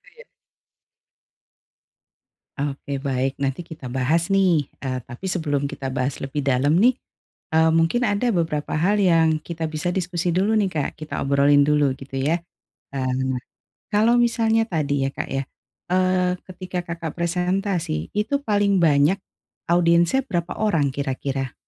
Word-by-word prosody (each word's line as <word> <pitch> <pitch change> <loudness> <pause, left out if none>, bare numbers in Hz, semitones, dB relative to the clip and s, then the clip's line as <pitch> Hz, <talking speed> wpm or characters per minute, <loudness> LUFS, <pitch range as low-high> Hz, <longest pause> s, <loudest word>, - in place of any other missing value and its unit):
Iya. 480 - -15 2.3
Oke, 140 -1 -3
baik 135 0 -2
nanti 140 +5 -2
kita 160 -6 -9
bahas 135 +7 +1
nih, 185 -7 +3 0.2
eee, 130 -1 -2
tapi 120 +9 -9
sebelum 145 -5 -1
kita 135 - -5
bahas 130 0 -2
lebih 135 +1 -3
dalam 140 +3 +2
nih, 250 - +7 0.6
eee, 160 0 +5
mungkin 165 +10 +2
ada 210 +2 +1
beberapa 160 -3 -1
hal 195 +7 +2
yang 165 -4 +3
kita 160 0 -4
bisa 155 +3 -3
diskusi 180 -1 -1
dulu 200 +4 +2
nih, 200 - +2
Kak, 150 -3 -1
kita 155 - -4
obrolin 140 +1 +4
dulu 145 -2 +2
gitu 135 -1 -7
ya, 165 +5 0 0.5
eee, 130 0 -1 0.7
kalau 225 +4 +4
misalnya 225 -1 +2
tadi 145 -6 0
ya, - - -1
Kak, - - -4
ya, 135 0 -1 0.5
eee 185 0 +2 0.2
ketika 185 0 -5
Kakak 165 -2 -5
presentasi 180 - -1
itu 280 +7 0
paling 205 -3 +2
banyak 150 +3 +4 0.6
audiensnya 170 +8 +3
berapa 175 -2 -2
orang 165 -10 +2
kira-kira? 135 -1 -3
160 Hz, 140 wpm, -23 LUFS, 140-185 Hz, 2.3 s, nih